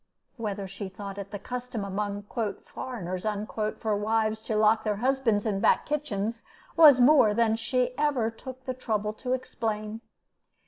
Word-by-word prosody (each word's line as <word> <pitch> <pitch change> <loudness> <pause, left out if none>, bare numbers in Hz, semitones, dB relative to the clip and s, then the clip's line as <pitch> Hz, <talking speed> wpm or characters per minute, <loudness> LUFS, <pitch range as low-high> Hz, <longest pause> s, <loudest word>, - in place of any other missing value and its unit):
Whether 205 -4 -4
she 195 +1 -6
thought 200 +1 -7
it 200 0 -6
the 205 - -5
custom 245 0 -5
among 205 +1 -3 0.4
"foreigners" 185 -8 -5
for 215 0 -2
wives 220 +1 0
to 220 - -3
lock 215 +1 +4
their 210 -1 0
husbands 240 -2 +1
in 205 -3 0
back - - +3
kitchens 230 -7 -2 0.3
was 300 -6 +8
more 245 -5 +6
than 225 -1 +3
she 250 +2 -1
ever 275 -7 +1
took 255 +3 -10
the 255 - -2
trouble 215 -4 -2
to 250 +3 -3
explain. 220 -4 -3
220 Hz, 150 wpm, -28 LUFS, 205-250 Hz, 0.4 s, was